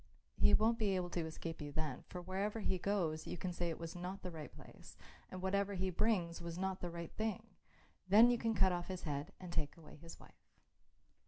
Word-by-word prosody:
He - - +7
won't 230 +2 +3
be 200 -3 +2
able 180 -1 -1
to 165 -2 -1
escape 165 0 -5
you 145 -1 -5
then, 150 -3 -3
for 180 -1 -6
wherever 200 +4 -1
he 190 -2 0
goes 170 -6 0
you - - -3
can 180 +1 -3
say 175 0 -1
it 165 - -3
was 165 0 -6
not 180 +2 -5
the 180 - -4
right 155 -3 -7
place - - -13 0.3
and 185 0 -7
whatever 200 +1 +1
he 185 0 0
brings 175 -4 +1
was 170 0 -5
not 190 0 -1
the 175 - -2
right 170 -1 -6
thing. 220 0 -1 0.7
Then 225 +5 +9
you 240 - +1
can 225 -1 +1
cut 190 -2 +5
off 175 -1 -2
his 185 -1 -5
head 145 +3 -3
and 180 -2 -7
take 150 -1 -1
away 160 -2 -13
his 165 +2 -11
wife." - - -19
180 Hz, 225 wpm, -37 LUFS, 165-195 Hz, 0.7 s, Then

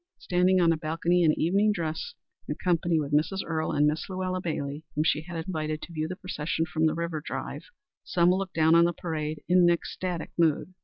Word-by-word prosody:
Standing 180 +1 +2
on 170 -2 +4
a 165 - +1
balcony 165 +3 +1
in 160 -3 +3
evening 200 +6 +3
dress, 160 -5 -3 0.3
in 150 - -2
company 170 -1 +1
with 145 -1 -3
Mrs. 165 +6 +1
Earle 160 -1 -1
and 145 0 +3
Miss 150 +4 -1
Luella 185 -1 -2
Bailey, 150 -3 -4
whom 150 - +2
she 155 -1 +1
had 165 0 -6
invited 155 -3 -3
to 175 - -9
view 155 -1 -2
the 185 - -5
procession 165 -4 -2
from 160 -1 +1
the 155 - 0
River 170 -2 -3
Drive, - - -5 0.4
Selma 175 +1 +3
looked 190 -1 -4
down 160 0 +4
on 170 0 +6
the 175 - +1
parade 155 -3 -4
in 180 +1 +4
an 175 -1 +6
ecstatic 175 0 -2
mood. 165 +2 +2
165 Hz, 210 wpm, -27 LUFS, 155-180 Hz, 0.4 s, on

